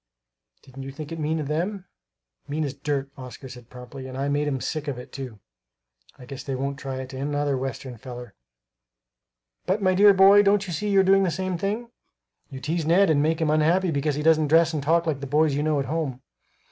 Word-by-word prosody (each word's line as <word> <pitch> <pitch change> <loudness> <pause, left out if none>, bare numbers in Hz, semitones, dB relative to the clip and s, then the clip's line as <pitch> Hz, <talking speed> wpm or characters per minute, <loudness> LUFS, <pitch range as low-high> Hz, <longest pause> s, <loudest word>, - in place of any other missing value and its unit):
Didn't 135 +1 -11
you 135 0 -6
think 145 +2 -8
it 165 - -5
mean 155 +1 -1
of 150 - -4
them?" 180 +6 -2 0.6
"Mean 150 +2 -2
as 140 -3 -3
dirt," 140 -1 -3
Oscar 130 +1 -9
said 125 -2 -12
promptly; 125 +2 -10
"and 130 0 -7
I 140 +1 -1
made 145 +1 0
'em 135 -2 -1
sick 155 +3 -4
of 140 -3 -3
it, 125 - -10
too. 130 -6 -8 0.8
I 125 - -12
guess 135 +1 -8
they 135 -2 -3
won't 140 +2 -3
try 135 -3 -5
it 130 +1 -9
on 130 - -6
another 145 0 0
Western 130 -1 -5
feller!" 120 -2 -9 1.3
"But, 190 +3 +1
my 185 -1 +3
dear 200 +2 +7
boy, 195 +2 +7
don't 200 0 +3
you 175 - -5
see 210 +6 -2
you 195 -1 +5
are - - +2
doing 195 +1 +4
the 190 - +2
same 185 +2 -2
thing? 215 +7 -3 0.6
You 135 - -8
tease 160 +4 -2
Ned 175 +3 +4
and 145 -2 +3
make 160 +2 +1
him 155 -1 +2
unhappy 165 +4 +2
because 145 0 0
he 150 - -3
doesn't 155 -1 +4
dress 165 +2 +4
and 150 - -1
talk 165 +4 +2
like 155 -4 -1
the 140 - -6
boys 150 +2 +2
you 145 - 0
know 150 -1 +1
at 135 - -1
home." 140 -3 -3
150 Hz, 230 wpm, -25 LUFS, 135-170 Hz, 1.3 s, dear